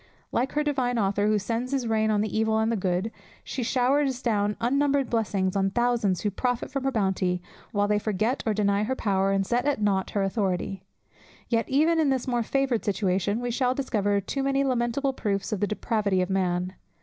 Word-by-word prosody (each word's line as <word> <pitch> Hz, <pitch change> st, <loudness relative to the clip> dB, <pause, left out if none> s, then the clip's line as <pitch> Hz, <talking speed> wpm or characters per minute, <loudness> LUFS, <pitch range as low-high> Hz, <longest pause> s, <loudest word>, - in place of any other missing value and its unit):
Like 250 Hz, +3 st, 0 dB
her 300 Hz, -, +1 dB
divine 260 Hz, -5 st, 0 dB
Author, 205 Hz, -1 st, +1 dB
"who 215 Hz, 0 st, +3 dB
sends 230 Hz, +5 st, -2 dB
his 265 Hz, -3 st, 0 dB
rain 220 Hz, -1 st, +1 dB
on 210 Hz, -1 st, +2 dB
the 215 Hz, -, -2 dB
evil 220 Hz, 0 st, +2 dB
and -, -, +2 dB
on 220 Hz, -, +1 dB
the -, -, +1 dB
good," 190 Hz, +2 st, -1 dB, 0.3 s
she 265 Hz, -, -4 dB
showers 260 Hz, +2 st, +1 dB
down 210 Hz, -3 st, +1 dB
unnumbered 275 Hz, +2 st, +1 dB
blessings 200 Hz, -5 st, 0 dB
on 195 Hz, 0 st, +2 dB
thousands 235 Hz, -4 st, +1 dB
who 205 Hz, -, 0 dB
profit 245 Hz, +5 st, -2 dB
from 270 Hz, 0 st, -3 dB
her 270 Hz, -, +2 dB
bounty, 190 Hz, -5 st, 0 dB, 0.3 s
while 205 Hz, 0 st, +1 dB
they 210 Hz, 0 st, +2 dB
forget 215 Hz, +4 st, -1 dB
or 215 Hz, -, +1 dB
deny 200 Hz, -1 st, +2 dB
her 245 Hz, +5 st, -1 dB
power, 195 Hz, -4 st, +1 dB
and 195 Hz, 0 st, +1 dB
set 245 Hz, +4 st, 0 dB
at 290 Hz, -5 st, +1 dB
nought 195 Hz, -2 st, +1 dB
her 200 Hz, -, 0 dB
authority. 195 Hz, -1 st, -1 dB, 0.7 s
Yet 230 Hz, -1 st, 0 dB
even 315 Hz, +5 st, +3 dB
in 305 Hz, -3 st, +3 dB
this 265 Hz, -2 st, 0 dB
more 240 Hz, -2 st, +1 dB
favoured 265 Hz, 0 st, 0 dB
situation 200 Hz, +2 st, 0 dB
we 245 Hz, 0 st, -2 dB
shall 250 Hz, +1 st, +1 dB
discover 205 Hz, -7 st, 0 dB
too 235 Hz, +8 st, -3 dB
many 275 Hz, 0 st, +1 dB
lamentable 260 Hz, +1 st, 0 dB
proofs 200 Hz, -5 st, -2 dB
of 210 Hz, -, -1 dB
the 205 Hz, -, +1 dB
depravity 205 Hz, -3 st, 0 dB
of 180 Hz, -, -4 dB
man. 180 Hz, -1 st, 0 dB
220 Hz, 210 wpm, -26 LUFS, 200-255 Hz, 0.7 s, who